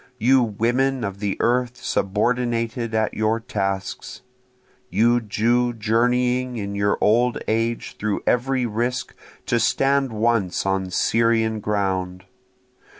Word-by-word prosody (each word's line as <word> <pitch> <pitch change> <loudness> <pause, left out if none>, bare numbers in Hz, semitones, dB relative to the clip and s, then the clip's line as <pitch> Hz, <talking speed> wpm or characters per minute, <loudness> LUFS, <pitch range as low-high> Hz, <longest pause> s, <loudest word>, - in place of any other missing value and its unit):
You 130 +3 +4
women 120 +4 0
of 100 -1 -4
the 100 -1 -2
earth 125 +1 +1
subordinated 115 +2 -1
at 110 -1 0
your 110 +1 0
tasks! 95 -4 -4 0.7
You 120 +4 +3
Jew 120 +3 +1
journeying 125 +3 +1
in 100 -2 -4
your 100 0 +1
old 120 +3 +3
age 115 +1 -1
through 105 -1 -2
every 125 +1 +1
risk 120 +3 -2 0.3
to 120 - +1
stand 135 +2 +2
once 110 -5 0
on 95 -1 -1
Syrian 115 +3 +1
ground! 95 -3 -2
115 Hz, 115 wpm, -22 LUFS, 105-125 Hz, 0.7 s, You